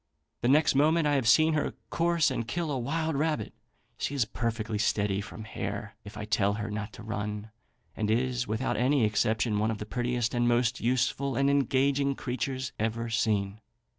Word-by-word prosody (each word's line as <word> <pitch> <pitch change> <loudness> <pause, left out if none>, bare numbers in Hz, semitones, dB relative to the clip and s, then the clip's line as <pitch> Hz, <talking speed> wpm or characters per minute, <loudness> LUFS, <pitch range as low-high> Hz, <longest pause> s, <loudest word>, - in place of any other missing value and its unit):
The 120 - +1
next 150 +4 +4
moment 155 +4 +3
I 145 - +2
have 135 -5 +1
seen 155 +8 +5
her 150 - -1 0.2
course 170 -1 +2
and 115 - -3
kill 170 0 -2
a 135 - -1
wild 160 +5 -1
rabbit. 155 +2 -1 0.5
She 145 - -2
is 130 -5 +2
perfectly 110 -1 -3
steady 105 -2 +1
from 110 +2 -8
hare 105 -1 -5
if 105 0 -10
I 105 - -4
tell 100 -1 +2
her 105 0 -4
not 105 0 -4
to 110 - -10
run, 105 0 -4 0.4
and 105 -1 -1
is, 125 +2 0
without 110 +5 -1
any 130 -1 +3
exception, 105 0 +1
one 110 +1 +1
of 110 - -2
the 105 - -6
prettiest 120 +1 -1
and 120 -1 +2
most 120 +1 +2
useful 130 +2 0
and 140 +2 +3
engaging 140 0 +2
creatures 130 +1 -3
ever 115 +1 -2
seen. 105 -2 0
120 Hz, 185 wpm, -29 LUFS, 110-140 Hz, 0.5 s, seen